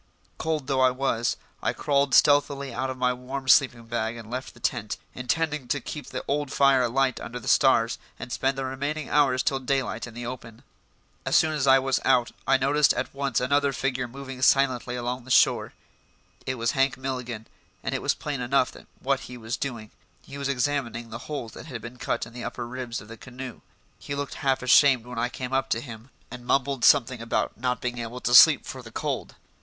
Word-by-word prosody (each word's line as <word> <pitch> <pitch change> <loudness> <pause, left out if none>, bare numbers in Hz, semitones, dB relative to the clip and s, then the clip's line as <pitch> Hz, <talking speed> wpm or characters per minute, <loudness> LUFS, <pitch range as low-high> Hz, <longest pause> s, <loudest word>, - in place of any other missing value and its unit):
Cold 155 -3 -1
though 130 -1 +1
it 130 - -1
was, 120 -3 0 0.2
I - - 0
crawled 140 -1 +1
stealthily 140 -2 +3
out 130 +3 -2
of 130 - -5
my 125 0 +2
warm 130 +2 -6
sleeping 125 -2 +4
bag 115 0 -2
and 115 -1 -10
left 130 +1 -5
the - - -16
tent, - - -2 0.2
intending 150 +2 -1
to 145 - 0
keep 145 +3 -7
the - - -6
old 145 -1 -1
fire 140 -2 +4
alight 130 +2 +1
under 125 +1 -6
the - - -11
stars - - +3 0.2
and 125 - -8
spend 135 0 0
the 135 - -2
remaining 140 +3 -3
hours 135 -3 +3
till 135 - 0
daylight 135 -1 -2
in 115 - -12
the 120 0 -6
open. 120 -1 -8 0.6
As - - 0
soon 160 - +4
as 145 -3 0
I 135 0 +8
was 135 0 +1
out 120 -1 +3 0.2
I 135 0 +5
noticed 140 +3 +3
at - - -3
once 135 -4 0
another 140 +2 +2
figure 130 +1 -1
moving 135 +1 -9
silently 130 -2 +3
along 125 +1 -3
the 130 - -14
shore. - - +4 0.8
It 130 - -1
was 115 -1 0
Hank 135 -2 +1
Milligan, 125 -4 -5 0.4
and - - -2
it - - -2
was - - +1
plain 145 -4 -4
enough 130 +1 +1 0.3
what 135 0 +1
he 125 - -9
was 115 0 -4
doing: 115 -6 -5 0.3
he 140 - -10
was 140 0 -2
examining 125 -4 -1
the 115 - -6
holes 140 -7 -4
that - - -11
had 125 -6 -6
been 120 +1 -9
cut - - -2
in 115 - -14
the 120 0 -7
upper 120 - -5
ribs 125 -1 -5
of 105 - -13
the 115 +1 -10
canoe. 130 +1 -9 0.4
He 140 - -5
looked 140 0 -4
half 135 -2 +1
ashamed 130 -1 +5
when 125 -1 -6
I 120 - 0
came 125 +1 -6
up 135 0 0
with 115 - 0
him, 115 -1 -10 0.2
and 125 0 -8
mumbled 135 0 0
something 130 -4 +4
about 115 - -1
not 125 +1 -2
being 125 -1 -3
able 120 +2 -5
to 120 - 0
sleep 140 +3 +8
for 130 - -7
the 115 - -11
cold. - - -3
130 Hz, 215 wpm, -26 LUFS, 120-140 Hz, 0.8 s, I